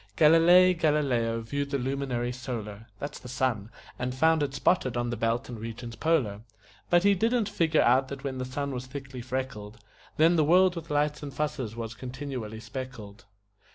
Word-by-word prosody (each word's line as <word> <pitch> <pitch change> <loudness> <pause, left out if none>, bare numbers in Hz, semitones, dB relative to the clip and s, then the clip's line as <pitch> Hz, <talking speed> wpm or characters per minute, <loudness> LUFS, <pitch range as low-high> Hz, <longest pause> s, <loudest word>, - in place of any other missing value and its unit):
Galilei 170 +4 +6
Galileo 135 -9 +1
viewed 140 +5 -3
the 140 - 0
luminary 130 -2 -2
solar 115 -4 -6
(That's 145 +6 -6
the - - -11
sun) 125 -5 -1 0.3
and 125 +1 -2
found 160 +3 +3
it 140 -2 -2
spotted 130 -7 +1
on 120 0 -1
the - - -2
belt 115 +1 -1
and 120 -3 -7
regions 115 +1 -7
polar; 125 -12 0 0.5
But 175 0 +4
he 200 0 +5
didn't 225 +3 +1
figure 165 -6 +2
out 130 +3 +4
that 135 0 -8
when 135 -2 -4
the - - -2
sun 140 +2 -3
was 125 0 -5
thickly 135 -2 -7
freckled 125 -4 -5 0.4
Then 165 +2 +5
the 155 - +4
world 180 +4 +4
with 165 -1 -7
lights 150 0 0
and 145 -2 -6
fusses 135 -5 -3
was 115 -1 -5
continually 125 -3 -6
speckled. 120 -5 -8
130 Hz, 180 wpm, -28 LUFS, 120-150 Hz, 0.5 s, Galilei